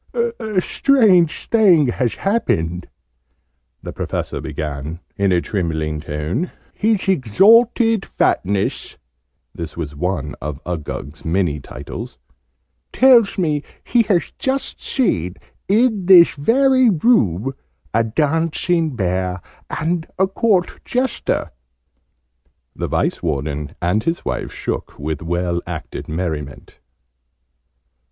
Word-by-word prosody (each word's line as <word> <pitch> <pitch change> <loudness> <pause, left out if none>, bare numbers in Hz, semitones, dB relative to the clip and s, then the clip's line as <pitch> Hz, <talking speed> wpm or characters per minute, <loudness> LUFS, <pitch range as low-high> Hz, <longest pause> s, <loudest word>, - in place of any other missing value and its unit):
"A 465 - -1
strange 205 - +3
thing 180 - +5
has 120 -1 -1
happened!" 90 - -1 1.0
the - - -6
Professor - - -3
began 75 +2 -5 0.2
in 100 -1 +1
a 90 -1 +3
trembling 80 -6 -2
tone. 80 - -3 0.2
"His 215 -2 0
Exalted 220 - +4
Fatness" 95 +1 -1 0.6
(this 85 -1 -7
was 75 -4 -5
one 90 -1 -2
of 70 0 -5
Uggug's 75 -3 -5
many 80 -3 0
titles) 65 -2 -8 0.7
"tells 245 -6 +5
me 155 -6 0 0.2
he 240 - +3
has 175 -6 +1
just 265 +1 -2
seen, 90 - 0 0.3
in 215 -2 +2
this 180 -3 +8
very 255 - +3
room, 135 - +2 0.4
a 115 +1 +3
Dancing 160 +5 0
Bear 90 -2 -1 0.3
and 165 +1 -2
a 190 - +4
Court 195 -2 0
Jester!" 255 0 -1 1.2
The - - -3
Vice - - -1
Warden 75 -2 -3
and 90 +6 0
his 165 +6 -2
wife - - -3
shook - - -5
with 75 0 -4
well 85 +1 -1
acted 85 -3 -6
merriment. 75 -4 -5
120 Hz, 105 wpm, -19 LUFS, -, 1.2 s, this